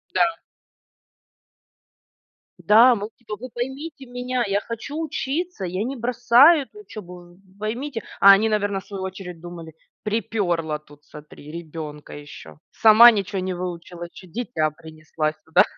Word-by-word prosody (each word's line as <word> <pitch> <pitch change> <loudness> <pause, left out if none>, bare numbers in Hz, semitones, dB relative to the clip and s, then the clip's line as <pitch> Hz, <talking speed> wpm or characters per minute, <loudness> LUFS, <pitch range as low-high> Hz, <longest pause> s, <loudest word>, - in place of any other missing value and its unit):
Да. 335 -1 +3 2.3
Да, 235 +4 +7
мы 205 - -6
вот 215 - -8
типа: 215 -3 -7
"Вы 255 +2 -8
поймите 270 +4 -6
меня, 245 0 -2
я 200 +1 0
хочу 230 +7 -6
учиться, 310 - -3
я 185 +4 -2
не 265 +3 -4
бросаю 250 +6 +5
эту 420 +10 -16
учебу, 180 - -11
вы - - -25 0.2
поймите". 230 +3 -4 0.2
А 200 - +10
они, 200 +3 +5
наверно, 205 -2 0
в - - -15
свою 195 -2 -6
очередь 180 -3 -7
думали: 170 -2 -9 0.3
"Припёрло 180 -8 -1
тут, 145 -1 -20
смотри, 150 0 -13
ребенка 155 -2 -8
ещё. 145 0 -11
Сама 225 +2 +8
ничего 200 -2 -2
не 185 0 -2
выучила, 175 -1 -6
ещё 185 - -14
дитя 175 -6 -2
принесла 155 0 -4
сюда, 160 +1 +3
205 Hz, 145 wpm, -23 LUFS, 170-245 Hz, 2.3 s, А